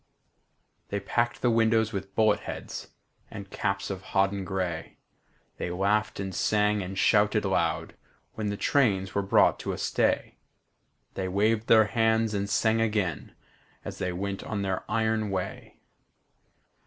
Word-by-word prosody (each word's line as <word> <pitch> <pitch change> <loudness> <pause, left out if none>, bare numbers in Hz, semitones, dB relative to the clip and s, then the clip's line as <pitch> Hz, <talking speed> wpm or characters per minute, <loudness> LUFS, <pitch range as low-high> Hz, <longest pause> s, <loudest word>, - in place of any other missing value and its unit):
They 100 - -2
packed 120 +4 -1
the 120 - +4
windows 110 -1 +2
with 95 0 -5
bullet 110 -2 +3
heads - - -7 0.4
And 100 -3 -9
caps 100 -1 -2
of 95 -1 -5
hodden 95 +1 0
gray; 90 -3 -4 0.6
They - - -3
laughed 100 +4 0
and 95 -1 -4
sang 105 +1 +1
and 95 +1 -6
shouted - - +3
loud - - 0 0.4
When 110 -1 -3
the 100 - -3
trains 100 -10 +1
were 100 - +1
brought 100 - +3
to - - -3
a - - -5
stay; - - 0 0.7
They 95 - -3
waved 105 +4 +1
their 110 -1 +6
hands 110 0 +1
and 100 0 -2
sang 110 +3 +2
again 105 -6 -1 0.5
As - - -7
they 90 - -1
went 100 +2 -4
on 105 -2 -3
their 95 -1 -2
iron 110 -1 0
way. 95 -2 -5
100 Hz, 145 wpm, -27 LUFS, 95-110 Hz, 0.7 s, their